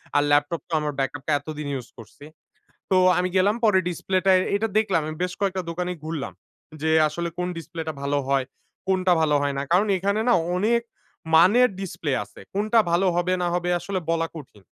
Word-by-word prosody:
আর 145 - +4
laptop 145 +3 +2
তো - - -7
আমার 150 -1 -3
backup 135 +1 -2
টা - - +1
এতদিন 150 -2 -7
ইউজ 125 -3 -5
করছি। 115 +5 -13 0.7
তো, 190 - +4 0.2
আমি 180 +1 +1
গেলাম 200 +4 +3
পরে 205 -3 +5
ডিসপ্লেটায় 185 +1 +2 0.2
এটা 220 +2 -1
দেখলাম, 195 -6 +1
আমি 155 - -4
বেশ 180 0 -1
কয়েকটা 190 -2 0
দোকানই 180 +1 -3
ঘুরলাম। 155 -4 -4 0.5
যে, 160 - +1 0.2
"আসলে 170 +3 -4
কোন 180 0 -1
ডিসপ্লেটা 160 -1 -6
ভালো 140 0 0
হয়, 135 -1 +2 0.4
কোনটা 185 -1 +2
ভালো 150 -2 +2
হয় 140 -1 -1
না!" - - -1
কারণ 195 +4 +4
এখানে 200 +3 0
না - - +5 0.2
অনেক 230 +5 +2 0.5
মানের 215 +10 +6
ডিসপ্লে 165 -6 -4
আছে। - - -16
কোনটা 215 +3 +2
ভালো 180 +3 +2
হবে 180 +1 +1
না - - +1
হবে 175 0 -1
আসলে 195 -1 -3
বলা 165 0 +1
কঠিন। 125 -9 -12
175 Hz, 190 wpm, -24 LUFS, 150-190 Hz, 0.7 s, মানের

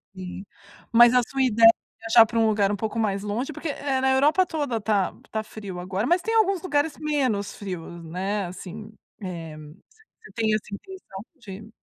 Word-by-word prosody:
Sim. 185 +1 -7 0.5
Mas 240 +1 +7
a 250 - +5
sua 270 0 -2
ideia 230 -2 +7 0.3
viajar 225 0 +6
pra 230 +1 -2
um 225 - +4
lugar 205 -2 +2
um - - 0
pouco 220 +3 -3
mais 200 -2 0
longe, 235 +8 -3
porque, 315 - -5
eh, 275 -2 -1
na 265 - +3
Europa 295 +8 +4
toda 290 -9 -2
tá 205 -3 0 0.2
tá 220 0 -2
frio 200 -4 -8
agora, 185 +4 -2
mas 350 +2 +3
tem 450 - -2
alguns 395 -5 +3
lugares 295 -3 0
menos 260 -10 -1
frios, 170 -3 -7
né, 190 +4 -2
assim, 190 +4 -9 0.3
eh, 165 -4 -6
você 155 +5 -14 0.5
tem 220 -2 +1
essa 215 - -1
intenção 285 - -9
de 210 -2 -11
220 Hz, 180 wpm, -25 LUFS, 195-265 Hz, 0.5 s, Mas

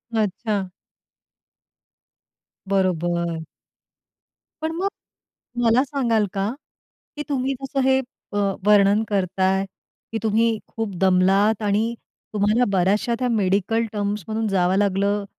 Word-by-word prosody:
अच्छा. 205 -1 -1 2.0
बरोबर. 175 -3 0 1.3
पण 320 - -1
मग 380 +4 0 0.8
मला 235 +2 +4
सांगाल 245 -6 +1
का, 195 +1 -1 0.7
की 295 - -3
तुम्ही 270 -1 0
जसं 270 0 -2
हे 265 0 +4 0.3
अ, 205 - -1 0.3
वर्णन 205 +1 +5
करताय, 190 0 +1 0.5
की 225 - -2
तुम्ही 225 +1 +2
खूप 220 -4 -4
दमलात 195 +4 +3
आणि 210 +3 +1 0.4
तुम्हाला 215 +4 +2
बऱ्याचश्या 200 +5 +2
त्या 255 - 0
मेडिकल 215 +1 +1
टर्म्स 205 -1 -2
मधून 220 0 -1
जावं 190 -1 +2
लागलं, 200 +1 +1
205 Hz, 105 wpm, -22 LUFS, 195-230 Hz, 2.0 s, वर्णन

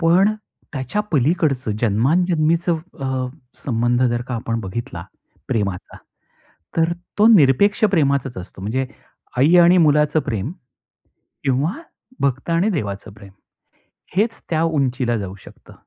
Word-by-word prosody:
पण 185 +6 +4 0.4
त्याच्या 135 +9 -2
पलीकडचं 140 -4 +1
जन्माजन्मीच 160 - +2
अ, - - +3 0.9
संबंध 120 0 +1
जर 120 -1 +1
का 125 - -2
आपण 115 0 -2
बघितला 95 -3 -6 0.4
प्रेमाचा, 100 -5 -2 0.8
तर 165 +1 +2 0.3
तो 215 - +7
निरपेक्ष 185 - +4
प्रेमाचाच 140 -7 +1
असतो. 90 +1 -9
म्हणजे 120 +7 -1 0.5
आई 150 +7 +5
आणि 175 +2 +6
मुलाचं 150 -1 +4
प्रेम 115 -1 -3 0.9
किंवा 140 +5 +1 0.5
भक्त 135 +3 -1
आणि 170 +5 +2
देवाचं 105 - -4
प्रेम, 100 -1 -14 0.9
हेच 215 +4 +3 0.2
त्या 160 -2 +1
उंचीला 130 -7 0
जाऊ 95 -2 -5
शकतं. - - -15
135 Hz, 115 wpm, -20 LUFS, 115-165 Hz, 0.9 s, तो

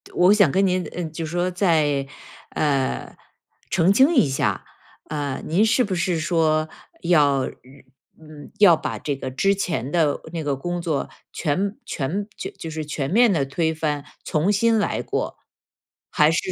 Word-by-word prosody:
我 180 +3 +5
想 200 -8 +4
跟 195 +4 +2
您， 185 0 0
呃， 180 - -4
就 160 +1 -5
说 175 +3 -1
再， 155 -7 +1 0.4
呃， 140 -3 -1 0.5
澄 185 +2 +3
清 270 +9 +5
一 240 - +5
下。 135 - -1 0.4
呃， 145 -3 -3
您 185 +7 +2
是 230 +3 +3
不 200 -4 -3
是 175 -1 0
说， 155 -1 +1 0.3
要 150 -5 +3
嗯， 140 +4 -13
要 195 -5 +7
把 - - -4
这 145 - -3
个 130 -1 -5
之 195 +9 +2
前 160 - -2
的 160 -4 +1
那 165 - -3
个 140 -2 -1
工 175 +5 -4
作 160 -4 -2 0.2
全 190 +7 -1
全， 175 +9 -3
就 - - -5
就 165 - -8
是 155 -1 -5
全 140 -2 -3
面 235 +1 +5
地 145 -5 +1
推 160 +4 -1
翻， 150 -2 -2 0.2
重 160 +6 +1
新 225 +2 +3
来 210 - 0
过？ - - -3 0.7
还 150 0 +4
是 165 - -1
160 Hz, 175 characters per minute, -23 LUFS, 145-185 Hz, 0.7 s, 要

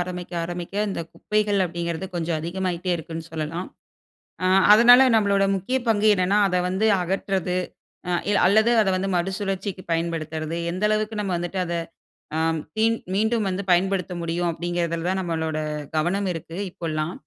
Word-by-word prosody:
ஆரம்பிக்க 180 0 -5
ஆரம்பிக்க 175 +2 -6
இந்த 190 - -3
குப்பைகள் 210 -1 0
அப்டிங்கிறது 170 +1 -3
கொஞ்சம் 170 -1 -1
அதிகமாகிட்டே 180 +1 -3
இருக்குன்னு 165 0 -7
சொல்லலாம். 165 +3 -4 0.8
அ - - +3 0.3
அதனால 240 +3 +8
நம்மளோட 200 -2 +3
முக்கிய 195 +8 -1
பங்கு 215 -1 +3
என்னென்னா, 195 +2 +2
அத 180 - 0
வந்து 190 +4 +1
அகற்றது, 185 0 -1 0.5
அ - - -1 0.2
இல் 205 - +3
அல்லது 220 +5 +4
அத 200 - 0
வந்து 190 +1 -1
மறுசுழற்சிக்கு 195 +1 -2
பயன்படுத்துறது, 165 -1 -2 0.2
எந்த 185 +4 -2
அளவுக்கு 215 0 -1
நம்ம 195 -3 -2
வந்துட்டு 175 +2 -3
அத 170 -1 -3 0.6
அ - - 0 0.4
மீண் 225 +1 +3 0.2
மீண்டும் 220 +2 +1
வந்து 190 +1 -2
பயன்படுத்த 185 +1 +2
முடியும் 170 +1 -1
அப்படிங்கிறதுல 170 0 -2
தான் 190 - 0
நம்மளோட 160 -3 -2 0.4
கவனம் 180 +6 0
இருக்கு 165 0 -8
இப்போலாம். 155 -1 -3
180 Hz, 145 wpm, -24 LUFS, 170-200 Hz, 0.8 s, அதனால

